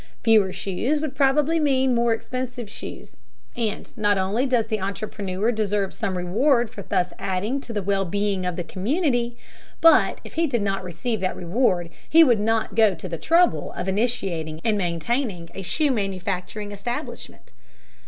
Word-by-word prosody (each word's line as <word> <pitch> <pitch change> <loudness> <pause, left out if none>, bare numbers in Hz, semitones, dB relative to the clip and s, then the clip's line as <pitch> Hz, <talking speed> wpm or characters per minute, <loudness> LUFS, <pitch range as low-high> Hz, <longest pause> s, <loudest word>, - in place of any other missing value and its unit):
Fewer 215 -4 +5
shoes 195 +10 -1
would 305 -2 -3
probably 295 +4 +3
mean 265 -3 +2
more 235 0 +2
expensive 250 0 -3
shoes. - - -9 0.4
And 225 -4 -3
not 205 -3 +2
only 200 +8 +1
does 245 -4 +2
the 215 -2 -2
entrepreneur 200 +1 -2
deserve 205 -3 -1
some 190 -2 -2
reward 235 +7 +2
for 200 - -8
thus 180 -1 -1
adding 205 +9 -1
to 245 - -9
the 205 -3 -2
well 195 0 +1
being 200 +1 -1
of 180 -1 -2
the 175 - -3
community, 240 - -1 0.4
but 330 0 +5
if - - -11
he 330 0 +1
did 240 -7 0
not 195 -1 -1
receive 185 +6 -3
that 185 -1 -1
reward, 175 -2 0 0.2
he 330 +1 +8
would 240 -8 +4
not 225 +1 0
go 220 -4 +4
to 170 - -7
the 165 -2 -5
trouble 345 +2 +2
of 180 - -4
initiating 190 -7 -1
and 220 -2 +2
maintaining 180 - -2
a 195 - -6
shoe 290 - +1
manufacturing 195 -1 -3
establishment. 240 +9 -6
215 Hz, 165 wpm, -24 LUFS, 190-245 Hz, 0.4 s, he